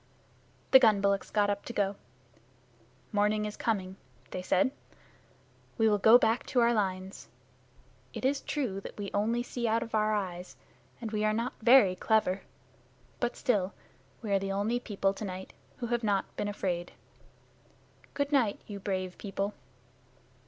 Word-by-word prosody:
The 265 - +10
gun 220 -5 +5
bullocks 200 0 +1
got 205 -1 +2
up 200 0 -3
to 240 - -6
go. 200 -2 0 1.2
"Morning 210 0 +1
is 210 - -5
coming," 190 -4 -2 0.3
they 185 - -4
said. 185 +6 +2 1.1
"We 225 - +4
will 210 -1 +3
go 220 +4 +8
back 230 0 +1
to 250 - +1
our 235 0 +4
lines. 190 -3 -3 0.8
It - - -5
is 275 +1 +1
true 235 -10 -2
that - - -9
we 200 -1 -5
only 230 +4 +1
see 245 -1 -3
out 225 +1 +1
of 225 - -11
our 215 0 +2
eyes, 180 -3 -5 0.4
and 225 -3 -5
we 215 -1 -1
are 215 0 +2
not 230 +3 -2
very 220 -5 +6
clever. 195 -1 +1 0.8
But 240 0 -1
still, 200 -5 0 0.5
we 210 - -3
are 195 - +4
the 195 0 -3
only 215 +5 0
people 195 -4 -1
to 205 - -7
night 190 -1 -6 0.2
who 245 - -4
have 240 0 -1
not 200 -3 0
been - - -2
afraid. 180 -4 -3 1.2
Good 285 0 -1
night, 245 -8 +2
you 205 -1 -7
brave 185 -2 -3
people." 200 0 -3
210 Hz, 160 wpm, -30 LUFS, 195-230 Hz, 1.2 s, The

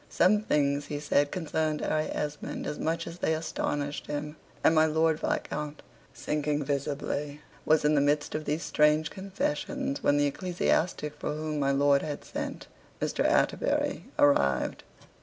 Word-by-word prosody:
Some 205 +4 +4
things 145 -6 +1
he 145 - -3
said 145 -1 +2
concerned 160 -3 -1
Harry 155 0 0
Esmond 150 0 -4
as 150 - -4
much 165 +1 -1
as 170 +1 -8
they 160 - +1
astonished 145 -2 -3
him. 150 +1 -4 0.3
And - - +5
my 160 0 +5
Lord 160 0 +2
Viscount, 150 0 -3 0.3
sinking 150 0 -1
visibly, 145 +1 -2 0.3
was 155 -1 +4
in 150 - +4
the 145 - +4
midst 145 +1 +1
of 155 0 -3
these 150 +3 -1
strange 150 +1 +3
confessions, 190 -7 -3
when 145 - +3
the 145 - +3
ecclesiastic 170 -1 0
for - - -2
whom 155 -1 -3
my 140 -1 +2
lord 140 0 +4
had 145 -2 -5
sent, - - -5 0.3
Mr. - - 0
Atterbury, - - +1
arrived. 70 - +3
150 Hz, 155 wpm, -29 LUFS, 145-155 Hz, 0.3 s, And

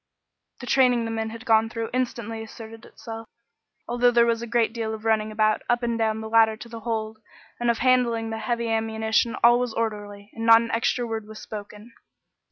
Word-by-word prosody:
The - - -6
training 245 -2 +3
the 225 - -3
men 220 0 -2
had 230 +2 -10
gone 225 -1 +3
through 230 -1 -5
instantly 235 -3 -3
asserted 225 +1 -11
itself. 225 -1 -10 0.6
Although 245 +1 +3
there 235 -1 +4
was 230 -1 0
a 235 - -5
great 230 -1 +1
deal 220 -2 -3
of 220 0 -12
running 220 -1 +1
about, 215 0 +1
up 240 0 +1
and 235 -1 0
down 220 -1 0
the 220 - -6
ladder 220 -1 +4
to 235 - -10
the 230 -1 -8
hold, 220 -1 -4 0.4
and 240 0 0
of 235 - +2
handing 245 -3 +2
up - - -5
the 220 - -4
heavy 235 0 -2
ammunition, 220 +1 0
all 240 +1 +6
was 245 -2 -2
orderly, 205 -2 -4
and 225 - -6
not 230 0 +8
an 230 0 -4
extra 235 +2 0
word 225 -2 -5
was 215 0 -10
spoken. 210 +2 -9
225 Hz, 210 wpm, -24 LUFS, 220-235 Hz, 0.6 s, not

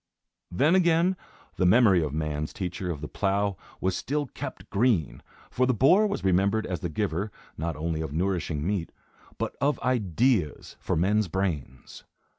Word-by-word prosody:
Then 145 - +2
again, 175 0 +3 0.4
the 90 - +2
memory 100 -3 +5
of 75 -3 -2
man's 75 0 -3
teacher 90 0 -4
of 75 -5 -4
the 75 - -4
plough 100 +2 0 0.2
was 95 0 0
still 145 +7 -1
kept 130 - -8
green; 105 - +1 0.3
for 130 +1 +1
the 130 - +2
boar 180 - +5
was 200 - -3
remembered 100 +4 +2
as 90 -3 -3
the 85 - -3
giver, 100 +3 -2 0.2
not 80 +1 -3
only 80 +1 -2
of 80 -3 -4
nourishing 85 -3 -1
meat, 95 -3 -1 0.5
but - - -3
of 145 +1 +1
ideas 115 - 0
for - - -1
men's 100 +5 +2
brains. 80 -8 -4
95 Hz, 160 wpm, -27 LUFS, 80-120 Hz, 0.5 s, memory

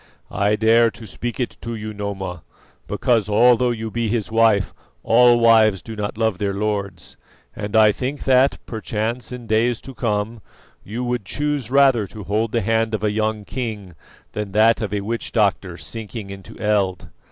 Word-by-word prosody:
"I 100 +1 +1
dare 115 +2 +4
to 115 0 -10
speak 120 +5 -5
it 125 - -3
to 115 0 -5
you, 110 0 -6
Noma, 95 -4 -5 0.5
because, 115 -4 +1
although 120 +3 +4
you 115 -2 -3
be 115 +1 -1
his 110 -1 -2
wife, 110 -3 +3 0.3
all 120 +1 +5
wives 110 -4 +4
do 110 - -8
not 105 0 -4
love 110 -5 0
their 100 -1 -1
lords; 100 -3 -3 0.4
and 105 +1 -5
I 110 -1 +6
think 135 +6 -4
that, 130 +1 +4
perchance 110 +2 -3
in 125 -1 -7
days 115 +2 +1
to 135 - -9
come, 110 -1 -2 0.4
you 115 +5 -5
would 120 -2 -2
choose 145 +2 -2
rather 135 -6 +4
to 105 +2 -9
hold 110 +3 -1
the 115 - +1
hand 110 +2 +1
of 105 - -5
a 105 - +2
young 110 0 -1
king 105 -5 -5 0.4
than 105 -2 -5
that 110 +2 +4
of 105 -3 -3
a 105 -1 -1
witch 115 +3 -4
doctor 100 -5 +1
sinking 110 -2 -7
into 95 -1 -11
eld. 100 -4 0
110 Hz, 175 wpm, -21 LUFS, 105-115 Hz, 0.5 s, I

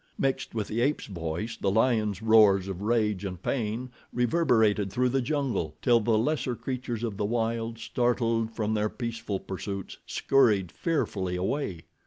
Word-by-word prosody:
Mixed 135 -3 -1
with 110 -3 -1
the 115 +2 -1
ape's 145 +4 +1
voice 85 +4 -4
the 100 - -1
lion's 110 -2 +1
roars 105 -4 +5
of 95 -1 -5
rage 105 -3 +1
and 90 -3 -4
pain 120 +3 -2 0.2
reverberated 110 - +2
through 125 +3 +2
the 135 +2 +1
jungle, 130 - -1
till 120 -2 +4
the 110 0 +2
lesser 125 +1 0
creatures 120 -1 -4
of 110 -4 -3
the 105 - 0
wild, 115 +1 -1
startled 115 -1 0
from 110 -1 -1
their 105 0 +1
peaceful 115 -5 -4
pursuits, 100 0 -6
scurried 105 -10 +3
fearfully 100 - -1
away. 95 - -2
110 Hz, 155 wpm, -28 LUFS, 100-120 Hz, 0.2 s, roars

